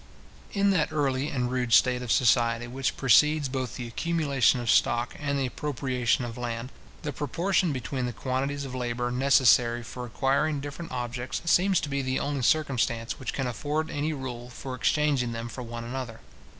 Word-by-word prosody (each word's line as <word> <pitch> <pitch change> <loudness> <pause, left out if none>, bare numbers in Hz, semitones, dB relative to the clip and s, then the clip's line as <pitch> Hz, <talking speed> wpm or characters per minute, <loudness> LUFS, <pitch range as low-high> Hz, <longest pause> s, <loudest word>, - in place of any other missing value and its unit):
In 200 0 +2
that 160 -5 +1
early 140 -2 0
and 125 -3 -1
rude 125 -2 0
state 125 0 +5
of 125 -3 -3
society 115 -1 +3
which 130 +2 -2
precedes 150 +4 +4
both 130 -3 -3
the 120 - -5
accumulation 140 -2 +1
of 120 -3 +1
stock 120 0 +2
and 140 -1 -1
the 135 - 0
appropriation 130 -3 -1
of 120 0 -7
land, 120 +1 -4 0.3
the 145 - -3
proportion 170 +5 0
between 130 -1 -3
the - - -3
quantities 135 +3 -2
of 130 - -7
labour 120 -1 -2
necessary 125 -2 +4
for 125 +2 -7
acquiring 140 +5 +1
different 145 +4 -7
objects, 125 +2 -4
seems 185 +2 +4
to - - -3
be 140 0 -1
the 130 0 -1
only 145 -1 -2
circumstance 125 -5 +1
which 130 - -3
can 135 - -2
afford 150 +7 -2
any 150 +2 -1
rule 125 -4 -6
for 130 +1 -7
exchanging 130 -2 +1
them 115 +1 -4
for 125 - -7
one 120 -1 -6
another. 120 -1 -6
130 Hz, 175 wpm, -27 LUFS, 120-145 Hz, 0.3 s, state